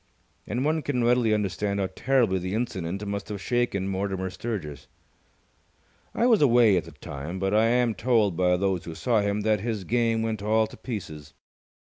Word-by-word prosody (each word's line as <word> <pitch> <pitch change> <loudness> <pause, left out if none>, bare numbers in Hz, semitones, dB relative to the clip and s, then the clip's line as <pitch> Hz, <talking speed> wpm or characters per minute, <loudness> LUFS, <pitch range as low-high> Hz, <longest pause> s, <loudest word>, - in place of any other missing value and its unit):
And 125 +6 -1
one 155 +1 +1
can 130 -5 -1
readily 120 -1 +3
understand 100 -1 -1
how 95 - 0
terribly 120 -8 +2
the 90 +3 -3
incident 100 -4 -3
must 100 +1 -4
have 105 -1 -4
shaken 120 -4 -1
Mortimer 95 -1 -2
Sturgis. 95 - -5 1.3
I 235 - +2
was 230 -7 +4
away 120 -6 +5
at 90 - 0
the - - -11
time, 70 +6 -7
but 95 +1 -1
I 110 +1 +4
am 120 -1 +2
told 110 -3 +1
by 90 +1 +2
those 95 -2 -1
who 85 - -7
saw 115 0 +1
him 100 +1 -1
that 110 0 +2
his 110 -1 -3
game 115 +2 +1
went 110 -2 -2
all 110 +1 +2
to - - -11
pieces. 80 - -7
105 Hz, 180 wpm, -26 LUFS, 95-120 Hz, 1.3 s, away